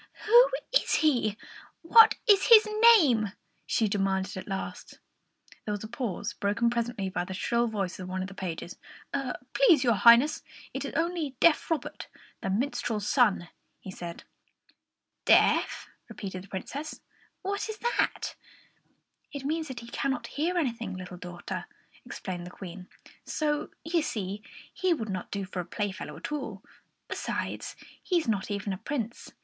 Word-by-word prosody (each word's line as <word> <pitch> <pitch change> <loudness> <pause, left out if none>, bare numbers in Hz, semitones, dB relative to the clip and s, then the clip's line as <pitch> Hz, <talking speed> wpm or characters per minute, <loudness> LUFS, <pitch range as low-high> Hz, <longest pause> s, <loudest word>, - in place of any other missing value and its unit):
"Who 480 +3 +7 0.2
is - - +3
he? 235 -8 +2 0.5
What 445 +6 +8
is 405 -4 +5
his 445 -2 +9 0.3
name?" 230 - +2 0.3
she 220 - +2
demanded 195 -1 0
at 185 - -7
last. 195 -1 -5 0.7
There 210 - -3
was 205 - -4
a - - -5
pause, 225 -3 -4
broken 230 +3 +1
presently 235 -4 -2
by 180 -1 -2
the 190 +1 -6
shrill 235 +4 +1
voice 200 -4 -3
of 185 0 -6
one 185 0 -2
of - - -4
the 200 - -10
pages. 180 -2 -6 0.7
"Please, 345 - +5
your 240 -2 +4
Highness, 235 - +6 0.3
it - - -3
is - - -5
only 325 -4 -1
deaf 335 -2 +4
Robert, 325 -2 -3 0.3
the - - -2
minstrel's 215 -1 -1
son," 210 -9 +3 0.3
he 190 - -8
said. 170 -2 -8 1.0
"Deaf!" - - +4 0.2
repeated 190 -2 -6
the - - -20
Princess. 275 +11 -6 0.4
"What 400 +3 -2
is 435 - -5
that?" 475 +3 -1 1.0
"It 280 -2 -6
means 315 +2 -1
that 260 -3 -6
he 235 - -11
cannot 265 +1 -2
hear 335 +5 -1
anything, 230 - -2
little 185 -1 -8
daughter," 175 0 -6 0.4
explained 180 -2 -6
the - - -7
Queen; 180 0 -9 0.4
"so, 300 -1 -1
you 330 +1 +1
see, 205 -7 -3 0.3
he 370 -2 +1
would 225 -7 -5
not 185 -2 -4
do 200 -1 -3
for 185 -1 -6
a - - -1
playfellow 190 -5 -4
at 165 - -6
all. 225 -10 -4 0.4
Besides, - - -4 0.3
he 360 - +1
is 325 - -1
not 205 -3 0
even 200 -1 -2
a 185 - -6
Prince. 240 -5 -4
225 Hz, 155 wpm, -28 LUFS, 190-300 Hz, 1.0 s, his